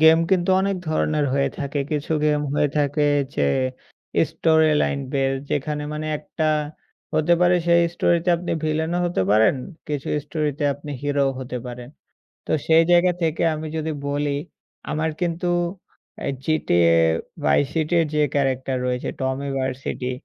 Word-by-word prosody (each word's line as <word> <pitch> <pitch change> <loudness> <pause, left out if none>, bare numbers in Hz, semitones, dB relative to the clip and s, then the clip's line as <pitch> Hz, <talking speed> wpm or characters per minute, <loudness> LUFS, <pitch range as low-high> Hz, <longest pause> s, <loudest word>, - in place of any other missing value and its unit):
Game 160 +1 +7
কিন্তু 185 -1 +2
অনেক 195 0 0
ধরনের 155 -1 +1
হয়ে 140 0 +2
থাকে। 140 0 -2
কিছু 150 +1 -2
গেম 150 -1 +2
হয়ে 150 0 +2
থাকে 145 +1 +1 0.3
যে 70 - +1 0.8
স্টোরি 160 -1 +3
লাইন 140 - 0
বেজ 135 -1 +1 0.2
যেখানে 150 +1 -1
মানে 155 0 -4
১ - - -13 0.2
টা 155 -1 +3 0.7
হতে 155 +3 +3
পারে 180 0 +5
সেই 170 0 +5
স্টোরিতে 170 +1 +1
আপনি 175 +1 -4
ভিলেনও 160 +3 0
হতে 175 - 0
পারেন। 110 +4 +5 0.3
কিছু 145 -2 -3 0.2
স্টোরি 150 0 -1
তে 150 - -1
আপনি 145 +1 -10
হিরোও 140 -1 +1
হতে 125 -1 -5
পারেন। 120 0 -8 0.6
তো - - -7 0.2
সেই 165 0 +6
জায়গা 175 +1 +5
থেকে 160 -1 0
আমি 155 +1 -5
যদি 160 0 -2 0.2
বলি 145 +1 -1 0.6
আমার 160 +1 0
কিন্তু 175 0 -1 0.7
অ্যা - - -4 0.2
GTA: 85 - +3 0.5
Vice 105 - +3
City 160 0 -1
এর 165 - +1
যে - - +1 0.2
ক্যারেক্টার 135 -1 0
রয়েছে 125 0 -2
Tommy 130 +1 -2
Vercetti, 130 -1 -3
150 Hz, 155 wpm, -22 LUFS, 135-160 Hz, 0.8 s, গেম